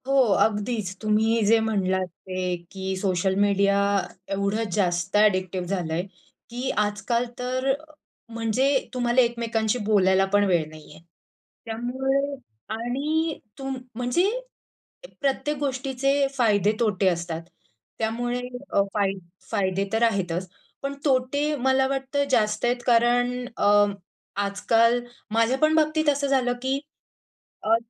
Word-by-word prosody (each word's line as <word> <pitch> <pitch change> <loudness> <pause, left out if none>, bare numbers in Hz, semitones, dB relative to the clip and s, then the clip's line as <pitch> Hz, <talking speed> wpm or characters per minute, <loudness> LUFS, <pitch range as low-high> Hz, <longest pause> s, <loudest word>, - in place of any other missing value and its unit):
हो. 275 - +1 0.3
अगदीच. 210 -2 -1
तुम्ही 220 +1 +2
जे 225 +2 +5
म्हणलात 190 -4 0 0.2
ते, 185 -1 -1 0.2
की 190 0 -3
सोशल 190 0 0
मीडिया 200 0 +3 0.6
एवढं 200 +3 -1
जास्त 175 -1 0
अडिक्टिव 185 -3 +2
झालंय, 175 -3 -1 0.5
की 245 +2 -3
आज-काल 210 +3 0
तर 255 +2 0 0.6
म्हणजे 230 +3 0 0.3
तुम्हाला 245 0 +3
एकमेकांशी 235 -1 0
बोलायला 195 -2 +4
पण 205 0 +5
वेळ 170 -4 +2
नाही 155 -1 -13
आहे. 160 - -16 0.6
त्यामुळे 265 +5 -1 0.4
आणि 290 +8 -1 0.2
तुम 270 0 -4 0.2
म्हणजे 250 +9 +1 1.0
प्रत्येक 285 +2 0
गोष्टीचे 275 0 0
फायदे-तोटे 210 -3 +2
असतात. 170 -2 -1 0.6
त्यामुळे 240 +2 -1 0.3
अ, 200 - +5
फाय 200 -2 +1 0.4
फायदे 195 0 0
तर 225 +1 +2
आहेतच 185 -5 0 0.3
पण 275 0 -3
तोटे 285 +3 +1
मला 265 0 +2
वाटतं 270 +1 -1
जास्त 215 -3 +2
आहेत. 245 0 0
कारण 245 +1 +3
अ, 205 0 +5 0.6
आज-काल 225 +4 +2 0.3
माझ्या 230 +3 +2
पण 310 +3 +3
बाबतीत 310 0 +2
असं 285 0 +1
झालं, 260 -3 +2
की 265 +1 0 0.8
अ, 220 +1 +4
225 Hz, 115 wpm, -25 LUFS, 200-260 Hz, 1.0 s, जे